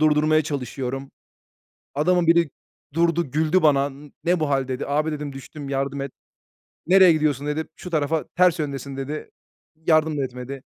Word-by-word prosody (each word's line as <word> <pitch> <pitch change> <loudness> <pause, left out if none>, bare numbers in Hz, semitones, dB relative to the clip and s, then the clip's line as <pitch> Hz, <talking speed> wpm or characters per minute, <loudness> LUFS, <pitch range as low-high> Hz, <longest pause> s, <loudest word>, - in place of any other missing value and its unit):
durdurmaya 155 0 +4
çalışıyorum. 135 -2 -4 0.8
Adamın 175 +4 +2
biri 165 -3 +4 0.4
durdu, 170 -2 +1
güldü 160 +6 +2
bana. 140 -2 +4
"N 145 +1 -13
ne 175 0 +2
bu 155 - +1
hâl?" 135 -1 +1
dedi. 130 +1 -3
"Abi" 150 +2 0
dedim, 150 -1 -4
"düştüm. 140 +1 -9
Yardım 140 0 -2
et." 140 -1 -4 0.8
"Nereye 185 -1 +7
gidiyorsun?" 150 -3 0
dedi. 155 +2 -1
"Şu 180 - -9
tarafa, 155 -1 0
ters 180 -2 +4
yöndesin." 140 -2 -4
dedi. 145 +3 -5 0.6
Yardım 155 -2 +3
da 140 - 0
etmedi. 130 +1 -6
150 Hz, 155 wpm, -23 LUFS, 135-160 Hz, 0.8 s, Nereye